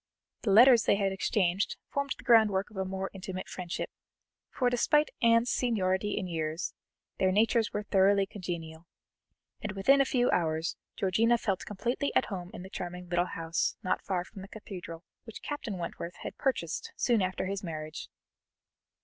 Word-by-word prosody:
The 220 - -1
letters 235 +3 +8
they - - +4
had 200 -1 +1
exchanged 190 0 0
formed 280 -1 -1
the - - -13
groundwork 210 -4 +4
of - - -15
a 190 0 -1
more 190 0 -4
intimate 185 -1 -6
friendship, 180 -2 -5 0.6
for 250 - 0
despite 295 +5 +3
Anne's 230 0 +4
seniority 205 -4 0
in 190 - -1
years, 160 -1 -3 0.5
their 190 0 +3
natures 220 +2 +3
were 210 - -2
thoroughly 195 0 +4
congenial, 170 -4 -6 0.7
and 210 - -4
within 270 +8 +4
a - - +4
few 250 -2 +2
hours 160 -1 0 0.2
Georgiana 220 +5 +3
felt 195 -5 -2
completely 240 +7 -1
at - - +4
home 180 -2 -5
in - - -8
the 190 - -9
charming 180 0 -6
little 175 0 +2
house 165 0 -1
not 185 - 0
far 185 -3 -1
from 195 - -11
the 195 - -9
Cathedral, 180 -5 -8 0.2
which 225 - -10
Captain 235 -9 -4
Wentworth 170 0 -5
had - - -5
purchased 210 - -2
soon 235 -4 +2
after 185 0 -1
his 195 +1 -3
marriage. 155 -2 -6
195 Hz, 165 wpm, -30 LUFS, 180-225 Hz, 0.7 s, letters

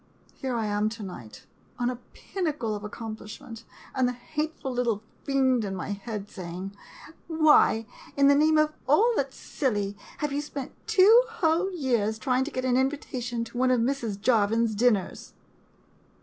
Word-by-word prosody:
Here 260 -3 -3
I 225 -2 -1
am 210 +1 +1
to 220 -1 -8
night, 120 - -9 0.3
on 245 0 0
a 250 - -6 0.2
pin 380 -2 -4
nacle 245 -9 -1
of 205 - -7
accomplishment, 225 +2 -8 0.3
and 255 -1 +2
the 250 - -1
hateful 300 +2 -4
little 235 -4 0 0.2
fiend 260 -4 +2
in 195 -2 -3
my 180 +1 -5
head 205 0 -5
saying, 185 +1 -7 0.3
" 320 - -18
Why, 310 -8 +4 0.3
in 280 0 +5
the 285 - +7
name 310 +2 +4
of 305 0 +3
all 430 - +5
that 275 -6 0
's - - -16
silly, 205 -7 -2 0.2
have 295 -2 -2
you 290 - 0
spent 285 -2 -6 0.2
two 430 +6 +7
whole 370 -3 +1
years 240 - 0
trying 255 +3 +1
to - - -4
get 255 0 -3
an 250 -1 +3
invitation 255 -3 -1
to 230 +1 -9
one 255 0 +3
of 250 -1 +3
Mrs. 230 -4 -1
Jarvin's 225 0 +2
dinners 215 -3 0
250 Hz, 175 wpm, -27 LUFS, 215-285 Hz, 0.3 s, the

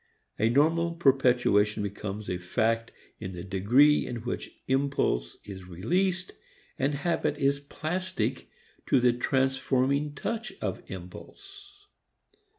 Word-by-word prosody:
A 110 +2 +3
normal 165 +6 +3
perpetuation 125 -9 +3
becomes 100 +1 -5
a 90 - -2
fact 115 +6 0 0.3
in 95 -3 -6
the 90 0 -7
degree 115 +11 +4
in 125 - -4
which 125 - -4 0.2
impulse 135 - 0
is 95 -2 -9
released 180 - -1 0.5
and 140 +2 +1
habit 150 -1 0
is 140 -1 +2
plastic 180 +6 -3 0.4
to - - +4
the 125 -1 +4
transforming 135 +3 +1
touch 225 +8 -4
of 95 -4 -3
impulse. 400 - -11
135 Hz, 115 wpm, -28 LUFS, 105-155 Hz, 0.5 s, degree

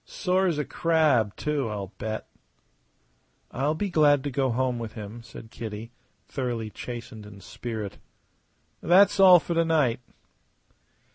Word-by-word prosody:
Sore 190 0 0
as 165 -4 0
a 150 - -1
crab, 150 - +2
too, 145 -5 -2
I'll 100 -1 -6
bet." 110 +1 -4 1.2
"I'll 140 +5 0
be 200 +3 -3
glad 145 -4 +4
to 145 - -3
go 130 0 0
home 125 0 0
with 115 -2 -6
him," 110 +1 -8
said 115 0 -12
Kitty, 110 0 -7 0.3
thoroughly 120 -5 -4
chastened 115 -2 -8
in 100 -1 -12
spirit. 105 +2 -6 0.8
"That's 195 +3 +5
all 185 -2 +9
for 170 - -4
to 165 0 +3
night." 150 -8 +1
125 Hz, 140 wpm, -26 LUFS, 110-160 Hz, 1.2 s, all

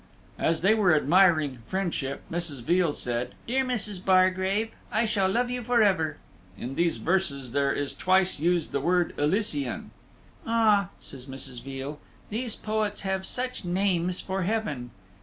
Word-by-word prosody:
As 160 -1 +1
they 195 +5 +5
were 195 -7 +4
admiring 155 -4 +4
Friendship, 170 -8 -2
Mrs. 165 -7 -4
Veal 175 +3 +3
said, 125 -2 -3
"Dear 265 +3 +1
Mrs. 215 -7 -3
Bargrave, 190 +3 +3 0.2
I 220 +2 +2
shall 200 -3 +1
love 245 +5 +1
you 250 0 -2
forever." 205 -9 +2 0.4
In 125 +5 -5
these 170 +3 +1
verses 150 -9 -1
there 140 +1 +2
is 145 -1 -2
twice 185 -2 +2
used 170 0 +1
the 140 - -1
word 175 +2 +2
"Elysian." 145 - -1 0.5
"Ah!" 215 -4 +3
says 135 -1 -10
Mrs. 130 -2 -7
Veal, 135 +2 -6 0.3
"these 230 +1 -3
poets 215 -1 -2
have 190 -1 -2
such 255 -2 -3
names 180 -1 0
for 190 0 -3
Heaven." 175 - -2
185 Hz, 145 wpm, -27 LUFS, 145-205 Hz, 0.5 s, they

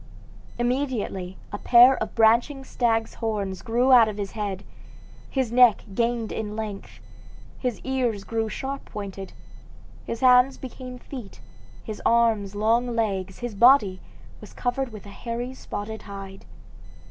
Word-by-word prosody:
Immediately 240 -7 -2 0.2
a 205 - -4
pair 245 +2 +7
of 220 - -4
branching 235 +5 +3
stag's 225 -3 0
horns 200 -5 -3
grew 245 +2 +1
out 240 -3 +8
of 210 -1 -5
his 200 -2 -4
head, 200 -3 -4 0.7
his 260 -4 -1
neck 240 -3 +5
gained 235 +1 -1
in 210 -1 -4
length, 215 -3 -7 0.6
his 250 -4 -2
ears 245 -6 -1
grew 225 +2 -2
sharp 275 +4 -5
pointed, 195 -2 -7 0.7
his 230 - -5
hands 255 +1 +5
became 255 -1 -8
feet, 245 -5 -10 0.4
his 215 -1 -7
arms 225 -4 +2
long 230 +3 +1
legs, 195 -4 -2
his 240 -2 -4
body 210 -4 +5 0.4
was - - -13
covered 250 +1 -2
with 215 -2 -10
a - - -10
hairy 240 +4 -5
spotted 220 -3 -6
hide. 195 -1 -9
225 Hz, 135 wpm, -25 LUFS, 205-250 Hz, 0.7 s, out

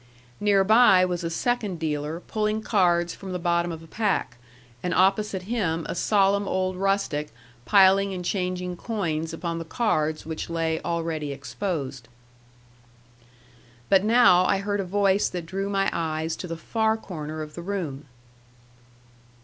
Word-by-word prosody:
Near 205 -2 +3
by 205 -3 +6
was 180 -1 -3
a 165 - -1
second 210 +1 -1
dealer 155 +1 -3
pulling 215 +1 -2
cards 175 -5 +2
from 190 -2 -8
the - - -1
bottom 170 0 0
of 165 0 -7
a - - -14
pack, 200 - -1 0.4
and 180 - -1
opposite 195 0 +2
him 185 -7 -1
a - - -3
solemn 200 +1 +2
old 185 0 -1
rustic 195 -6 0 0.4
piling 195 0 +5
and 180 -2 -5
changing 180 -1 -2
coins 165 -7 -2
upon 165 0 -4
the - - -4
cards 160 -5 -1
which 160 +1 -5
lay 165 -1 -1
already 165 -3 -2
exposed. 140 - -4 1.8
But 195 -1 +5
now 220 -5 +6
I 195 - +2
heard 205 +1 -2
a 195 - -1
voice 200 +1 +2
that 175 -2 -5
drew 195 +3 -3
my 195 -1 +1
eyes 160 0 -2
to 180 - -6
the 165 -1 -5
far 220 +5 0
corner 155 -7 -6
of 150 0 -10
the 170 - -7
room. 170 -7 -4
180 Hz, 150 wpm, -25 LUFS, 165-200 Hz, 1.8 s, by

